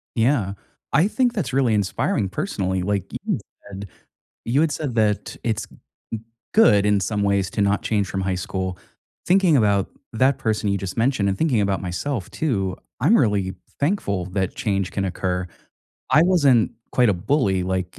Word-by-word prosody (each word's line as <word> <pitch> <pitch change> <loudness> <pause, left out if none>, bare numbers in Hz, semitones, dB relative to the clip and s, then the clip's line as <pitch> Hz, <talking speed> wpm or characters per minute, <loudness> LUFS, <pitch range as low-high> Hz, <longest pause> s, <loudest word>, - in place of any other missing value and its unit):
Yeah. 115 -4 +2 0.4
I 155 +7 +4
think 245 +2 +1
that's 175 - -2
really 130 -4 +3
inspiring, 100 0 0
personally, 95 - -2
like, 100 0 0
you - - -5
had - - -1 0.3
said 100 0 -7 0.6
you 135 +6 +2
had 160 - +2
said 145 -5 -3
that 105 -2 +1
it's 110 -2 -1 0.5
g 115 - -2 0.3
good 105 - +5
in 105 -1 +3
some 105 +2 -1
ways 100 -2 +1
to 105 - -1
not 100 +1 +2
change 105 -3 0
from 95 +1 -3
high 95 -1 -1
school. 95 -1 -3 0.5
Thinking 180 -4 +4
about 100 -4 +2 0.2
that 130 +4 +3
person 110 -2 -1
you 100 - +1
just 95 -1 -5
mentioned, 115 -3 +2
and 95 - -1
thinking 150 -8 +2
about 100 0 0
myself 95 +4 -3
too, 100 - -1 0.2
I'm 190 - +5
really 100 -5 +1 0.2
thankful 140 - 0
that 95 0 -2
change 100 -5 -1
can 100 - -2
occur. 90 0 -2 0.6
I 145 +4 +6
wasn't 145 -11 +4 0.2
quite 125 -2 +4
a - - +1
bully 95 - +1
like, 95 -1 -3
105 Hz, 175 wpm, -22 LUFS, 95-130 Hz, 0.6 s, I